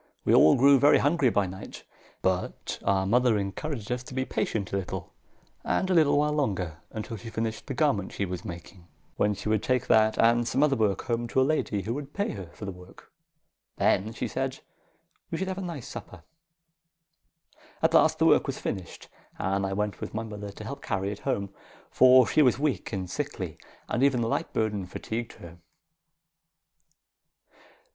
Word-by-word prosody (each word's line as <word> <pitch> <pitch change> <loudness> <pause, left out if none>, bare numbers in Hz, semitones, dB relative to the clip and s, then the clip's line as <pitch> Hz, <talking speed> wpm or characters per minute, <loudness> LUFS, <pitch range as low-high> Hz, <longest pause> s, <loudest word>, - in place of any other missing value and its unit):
We - - +3
all 80 - +7
grew 140 +2 +6
very 145 +2 +6
hungry 145 -2 +3
by 100 -3 +1
night; 95 +2 -9 0.4
but 95 -1 -2
our 95 -1 +2
mother 120 +2 +3
encouraged 105 +4 -4
us 125 0 -1
to 130 - -9
be 130 0 0
patient 100 -7 -2
a - - +2
little 95 -2 -5 0.5
and 190 - 0
a - - +4
little 155 -4 +4
while 150 +1 +2
longer, 95 - -1
until 110 +1 -6
she 115 - -9
finished 110 0 -4
the 135 - -4
garment 110 - +1
she 100 - -2
was 90 -1 -5
making, 85 +1 -9 0.3
when 105 0 +2
she - - -7
would 110 -1 +2
take 125 +1 0
that 110 0 +4
and 115 +1 +4
some 135 - +2
other 145 -2 +3
work 105 -5 +1
home 120 -1 -1
to 130 - 0
a - - +5
lady 125 -9 0
who 115 - -2
would 140 +1 -7
pay 200 0 -1
her 95 -4 -7
for 105 - -7
the 100 - -4
work. 90 +1 -15 0.7
Then, 105 +4 +2
she 115 - -3
said, - - -3 0.7
we 165 - -3
should 190 - -2
have 190 0 -3
a - - -4
nice 170 -9 -6
supper. 95 -7 -9 1.6
At - - +3
last - - +5
the - - +2
work - - +4
was - - -3
finished, 90 -3 -5 0.3
and 95 +1 0
I 95 - -3
went 105 +1 -2
with - - -6
my 110 - -2
mother 105 -2 -7
to 100 +2 -10
help 140 +6 -7
carry 100 -1 -2
it 105 - -7
home, 100 -1 -2 0.4
for 130 0 +7
she 155 - +3
was 125 -5 +4
weak 145 -1 -1
and 95 -3 -3
sickly, 90 - -5 0.3
and - - -1
even 130 -4 +3
a - - -1
light - - -1
burden 105 -4 -1
fatigued 115 +5 -5
her. 85 0 -13
110 Hz, 190 wpm, -27 LUFS, 100-130 Hz, 1.6 s, all